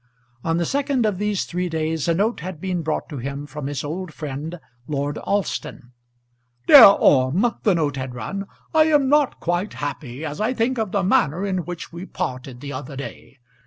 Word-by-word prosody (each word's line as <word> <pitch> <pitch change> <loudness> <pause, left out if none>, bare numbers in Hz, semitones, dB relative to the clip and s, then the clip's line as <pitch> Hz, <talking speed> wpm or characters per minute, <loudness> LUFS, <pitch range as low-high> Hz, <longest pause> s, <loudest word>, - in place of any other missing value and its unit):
On 165 0 0
the 170 - 0
second 275 - 0
of 205 -4 0
these 210 -2 0
three 180 0 -2
days 160 -1 -1
a 170 - +3
note 215 +6 +1
had 180 0 -6
been 180 -1 -2
brought 155 -1 -2
to 145 -5 -6
him 140 +3 -5
from 145 0 -6
his 140 -1 -3
old 165 +4 -4
friend 155 +3 -6 0.3
Lord 145 0 -2
Alston. 195 -10 -3 0.7
"Dear 275 -5 +11
Orme," 145 - +3
the 200 -4 +3
note 145 -4 0
had 130 -1 -5
run, 195 +10 -5 0.3
"I 315 -1 +6
am 295 -4 +3
not 295 -1 +3
quite 175 +4 -1
happy 145 -1 -5
as 150 +6 -5
I 240 +4 0
think 240 +2 0
of 215 -4 -1
the 200 -2 +1
manner 175 -1 +2
in 185 -4 -2
which 175 -1 -7
we 175 +3 -7
parted 125 -1 -5
the 145 0 -6
other 140 +1 -6
day. 140 0 -9
165 Hz, 195 wpm, -22 LUFS, 145-200 Hz, 0.7 s, Dear